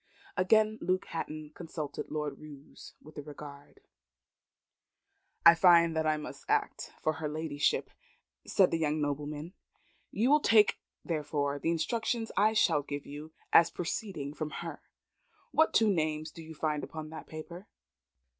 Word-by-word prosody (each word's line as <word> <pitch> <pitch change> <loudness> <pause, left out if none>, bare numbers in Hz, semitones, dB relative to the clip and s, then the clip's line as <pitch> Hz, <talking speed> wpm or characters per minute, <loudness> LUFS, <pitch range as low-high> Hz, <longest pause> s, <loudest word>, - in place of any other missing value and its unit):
Again 215 +3 +3
Luke 185 0 0
Hatton 155 -2 -5
consulted 160 -4 -6
Lord 150 -2 -3
Roos 145 -2 -13
with 155 0 -10
a - - -4
regard. 145 -1 -11 1.6
"I 170 - +11
find 170 -1 +5
I 155 -1 +1
must 150 - -8
act - - 0
for 155 - 0
her 155 0 -4
ladyship," 150 -1 -1 0.6
said 190 -2 +4
the 165 - 0
young 155 -1 0
nobleman. 150 +3 -3 0.6
"You 240 +6 +1
will 300 - +6
take, 220 -7 +4 0.3
therefore, 145 -3 -1
the 165 - -1
instructions 225 +7 -1
I 215 +2 +4
shall 215 -8 +3
give 145 0 -6
you, 150 +2 -9 0.2
as 165 - +7
proceeding 170 -5 -4
from 155 0 -4 0.2
her. - - -7 0.7
What 320 - +4
two 220 -3 +4
names 155 -2 -1
do 165 - -11
you 160 0 -10
find 150 0 -1
upon 155 -1 -7
that 160 - -9
paper?" 170 +5 -9
155 Hz, 145 wpm, -31 LUFS, 150-180 Hz, 1.6 s, I